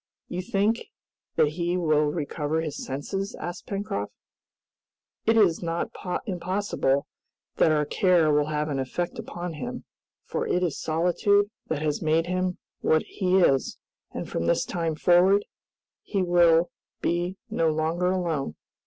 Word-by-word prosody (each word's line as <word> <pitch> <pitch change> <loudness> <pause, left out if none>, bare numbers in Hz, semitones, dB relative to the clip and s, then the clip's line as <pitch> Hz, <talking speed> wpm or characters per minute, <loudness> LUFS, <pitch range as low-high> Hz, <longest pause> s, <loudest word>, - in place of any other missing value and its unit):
"You 180 - -3
think 205 +5 0 0.5
that 150 - +4
he 175 +3 -1
will 155 -3 +3
recover 150 0 -1
his 155 -2 -4
senses?" 195 +9 -4
asked 175 - -6
Pencroft. 200 0 -3 1.2
"It 225 0 +5
is 190 -7 +4
not 170 0 -2 0.3
impossible 180 - 0 0.5
that 160 - +5
our 150 -1 +2
care 170 -3 +3
will 150 0 +2
have 150 0 -1
an 140 -2 -1
effect 175 - -3
upon 175 -6 -5
him, 245 +10 -6 0.4
for - - -2
it 180 - +1
is 170 -5 -1
solitude 200 +6 +2 0.2
that 155 -1 -2
has 150 -2 0
made 160 +1 +2
him 185 0 -1 0.2
what 155 0 +3
he 185 0 +1
is, 135 -6 +2 0.3
and - - -5
from 85 - -2
this - - +2
time 165 -2 -2
forward 180 +5 +4 0.6
he 195 -3 -1
will 175 -1 +4 0.3
be 175 +2 -1
no 165 -7 +2
longer 160 +3 0
alone." 165 - -1
175 Hz, 145 wpm, -26 LUFS, 155-185 Hz, 1.2 s, It